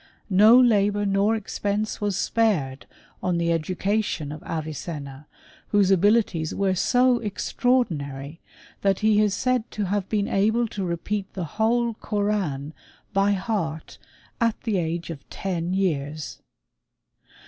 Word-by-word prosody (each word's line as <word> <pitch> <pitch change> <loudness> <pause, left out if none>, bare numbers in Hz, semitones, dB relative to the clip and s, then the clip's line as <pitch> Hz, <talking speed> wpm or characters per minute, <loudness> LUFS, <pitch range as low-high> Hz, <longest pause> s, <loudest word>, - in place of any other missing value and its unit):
No 215 +6 +7
labour 205 -4 +3
nor 200 +3 +2
expense 210 0 -2
was 205 -2 0
spared 175 -14 0 0.3
on 180 -1 0
the 170 0 +1
education 180 -1 -1
of 150 - -8
Avicenna, 150 -3 -6 0.4
whose 200 -2 +3
abilities 195 -4 +2
were 195 -1 +1
so 250 +6 +3
extraordinary 165 - -1 0.4
that 195 0 +1
he 215 -1 +4
is 205 -2 +2
said 255 0 0
to 210 - -3
have 195 0 -2
been 205 -2 0
able 220 +4 +2
to 200 - -4
repeat 190 +3 -3
the 185 - -3
whole 230 +6 +1
Koran 200 -10 -2 0.4
by 200 +1 +3
heart 190 -6 -3 0.4
at 230 -2 +1
the 215 -5 0
age 170 0 -3
of 145 -4 -10
ten 180 -1 -3
years. 155 -5 -2
195 Hz, 125 wpm, -24 LUFS, 165-215 Hz, 0.4 s, No